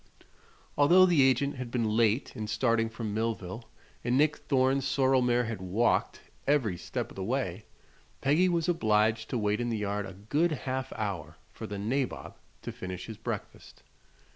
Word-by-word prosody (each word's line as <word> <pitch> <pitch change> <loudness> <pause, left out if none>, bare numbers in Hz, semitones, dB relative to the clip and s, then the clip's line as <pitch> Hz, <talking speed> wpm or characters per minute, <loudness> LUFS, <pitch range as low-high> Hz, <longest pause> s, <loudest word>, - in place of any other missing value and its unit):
Although 175 +6 +7
the 170 -6 +4
agent 135 +2 +2
had 125 -1 -5
been 115 -3 0
late 115 +4 +2
in 110 -3 -4
starting 115 +1 +1
from 110 -2 -5
Millville 110 -1 -3 0.3
and 125 +1 +1
Nick 150 +1 +3
Thorne's 135 0 +1
sorrel 135 -1 +2
mare 125 0 +2
had 115 -4 -5
walked 100 +6 +1 0.3
every 135 -10 +2
step 85 - -5
of - - -13
the 95 - -4
way, 110 -4 -2 0.5
Peggy 155 +7 +3
was 170 -1 0
obliged 110 -7 +2
to 125 - -1
wait 105 0 0
in 120 - -1
the 115 - -1
yard 105 -1 -2
a 95 - -9
good 145 - 0
half 130 0 -2
hour 85 -8 -4 0.2
for - - -7
the 100 - -5
"nabob" 125 +6 -2 0.3
to - - -4
finish 90 -1 -6
his 110 -2 -8
breakfast. - - -7
115 Hz, 170 wpm, -29 LUFS, 105-135 Hz, 0.5 s, Although